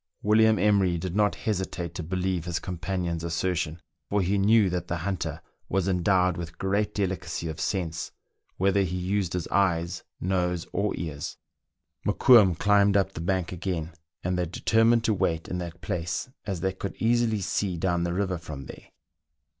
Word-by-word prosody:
William 110 +1 +5
Emery 95 -3 +3
did 90 +2 -4
not 105 -1 +3
hesitate 95 -4 -3
to 90 - -4
believe 90 0 -2
his 85 -1 -1
com 90 -3 -5
panion's 85 -3 -2
assertion, 85 -1 -1 0.3
for 100 - +2
he 95 +3 +1
knew 105 +1 +5
that 90 -1 -2
the 85 - -2
hunter 100 -2 -3 0.3
was 95 -1 +1
en 90 -2 +1
dowed 90 -1 +3
with 85 -1 -6
great 100 +2 0
delicacy 95 -4 -2
of 80 -1 -5
sense, 85 -4 -2 0.5
whether 100 +1 +3
he 90 -1 -1
used 95 0 -1
his 90 -2 -2
eyes, 85 -4 +1 0.2
nose, 90 -2 0
or 105 +1 0
ears. 80 -4 -5 0.7
Mokoum 105 -9 +6
climbed 100 -1 +4
up 95 -1 +1
the - - -6
bank 90 0 -1
again, 90 -3 -3 0.3
and 90 0 0
they 90 - 0
determined 115 +6 +3
to 110 - +2
wait 80 -4 0
in 90 - -3
that 85 -1 -7
place, 90 +5 -3 0.2
as 95 -5 -2
they 95 +1 0
could 95 +1 -5
easily 115 -1 +2
see 95 -1 -1
down 85 0 0
the 85 - -1
river 90 -1 -1
from 70 -5 -8
there. - - -11
90 Hz, 175 wpm, -27 LUFS, 85-100 Hz, 0.7 s, Mokoum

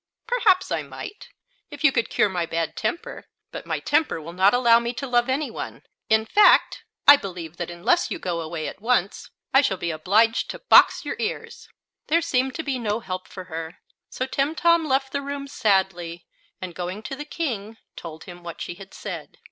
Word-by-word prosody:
"Perhaps 430 -6 +2
I - - 0
might, 410 - -9 0.4
if 290 0 -9
you 305 - +6
could 230 -3 0
cure - - +3
my 175 -4 -2
bad 165 -1 -2
temper; 365 +8 -4 0.2
but - - -8
my - - -1
temper 315 - +1
will 165 +2 -9
not 190 +3 +4
allow 235 -2 +5
me 235 +1 -3
to 275 - -5
love 240 -1 +1
any 280 +3 -1
one. - - -7 0.3
In 220 0 +3
fact, 415 - +4 0.2
I 285 - +11
believe 175 - -7
that 175 -1 -4
unless 195 - +1
you - - -3
go 175 - -3
away 160 -1 -4
at - - -8
once 225 -5 0 0.2
I 270 - +7
shall 195 -9 0
be 170 -1 -2
obliged 210 +8 +2
to - - -5
box - - +5
your - - -4
ears!" - - -5 0.4
There 335 +2 +2
seemed 260 -5 0
to 320 - -3
be 275 -3 -2
no 215 -1 -1
help 185 -3 -5
for 185 0 -9
her, 165 0 -7 0.3
so 255 - -3
Timtom 320 +5 +2
left 270 0 +1
the 280 - -2
room 280 0 -5
sadly, 190 -7 0 0.3
and 185 -2 -6
going 180 +5 -5
to 270 - -5
the 295 - -6
King, 230 -9 -4 0.2
told 160 -2 -9
him 175 -2 -11
what 170 -1 -8
she - - -5
had 195 +2 -13
said. - - -7
225 Hz, 200 wpm, -24 LUFS, 175-280 Hz, 0.4 s, I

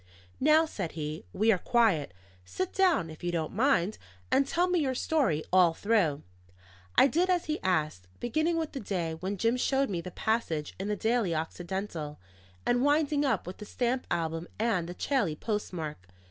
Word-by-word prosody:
"Now," 310 +3 +5
said 190 - -5
he, 155 - -5
"we 220 - +3
are 190 - +2
quiet. 210 - +2 0.3
Sit 90 - -4
down, 350 - +2
if 155 - -12
you 175 - 0
don't 160 -3 -2
mind, 215 -4 +2 0.3
and 275 - +3
tell 350 +4 +2
me 360 -1 +2
your 265 -4 0
story 250 - +1
all 180 -3 +5
through." 185 -10 +1 0.7
I - - +8
did 340 +7 +2
as 360 -2 +2
he 310 0 -2
asked, 155 - 0
beginning 315 +8 0
with 320 -2 -2
the 275 - -5
day 180 -7 -2
when 185 +5 -4
Jim 230 +5 +2
showed 270 -1 +1
me 175 -3 -2
the 180 - -7
passage 175 -7 -1
in 195 - -3
the 210 - 0
Daily 220 -4 +1
Occidental, 165 -1 -4 0.5
and 245 +1 +2
winding 290 0 +2
up 270 - 0
with 180 - -7
the 210 - -8
stamp 250 +4 -1
album 165 0 -2
and 210 -7 0
the 175 - -6
Chailly 220 - 0
postmark. 160 - -4
205 Hz, 180 wpm, -29 LUFS, 165-265 Hz, 0.7 s, I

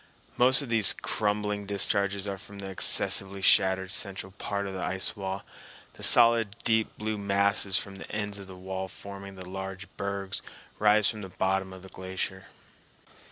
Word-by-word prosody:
Most 130 +3 +5
of 135 - -8
these 115 -3 +4
crumbling 105 -1 -1
discharges 100 0 +1
are 100 -1 -4
from 100 +1 -12
the 95 -1 -6
excessively 95 +1 +1
shattered 95 -1 +4
central 95 -1 -2
part 100 0 -4
of 95 - -5
the 95 - -4
ice 95 +3 0
wall; 95 -1 -5 0.5
the - - -14
solid 115 -3 +6
deep 110 -1 +1
blue 110 0 -3
masses 100 -1 +3
from 100 -1 -5
the - - -10
ends 105 -1 -3
of 100 - -10
the 95 - -10
wall 95 +1 -5
forming 100 +1 -9
the 95 -1 -9
large 95 +1 -6
bergs 100 -1 -4 0.4
rise 105 -1 +5
from 110 -2 -2
the 95 - -7
bottom 95 +1 -1
of 95 0 -11
the 95 - -11
glacier. 95 0 -5
100 Hz, 170 wpm, -28 LUFS, 95-105 Hz, 0.5 s, solid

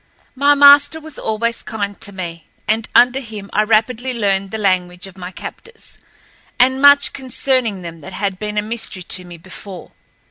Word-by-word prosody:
My 285 +2 +3
master 285 +2 +6
was 315 -2 -10
always 230 +2 -2
kind 205 -2 -5
to 200 - -1
me, 170 -4 -7 0.2
and 220 +1 0
under 245 +2 +5
him 215 -5 -9
I 210 - +3
rapidly 230 +4 0
learned 195 -3 0
the 220 - -5
language 180 -3 -1
of 190 -1 -12
my 180 -1 -7
captors, 455 - -3 0.6
and 260 +1 +3
much 285 0 +6
concerning 255 -6 -1
them 165 -1 -9
that 185 +6 -10
had 195 -1 -3
been 210 0 -4
a 210 - +1
mystery 220 -4 -4
to 180 +1 -2
me 175 -1 -11
before. 185 +2 -10
215 Hz, 175 wpm, -18 LUFS, 190-255 Hz, 0.6 s, master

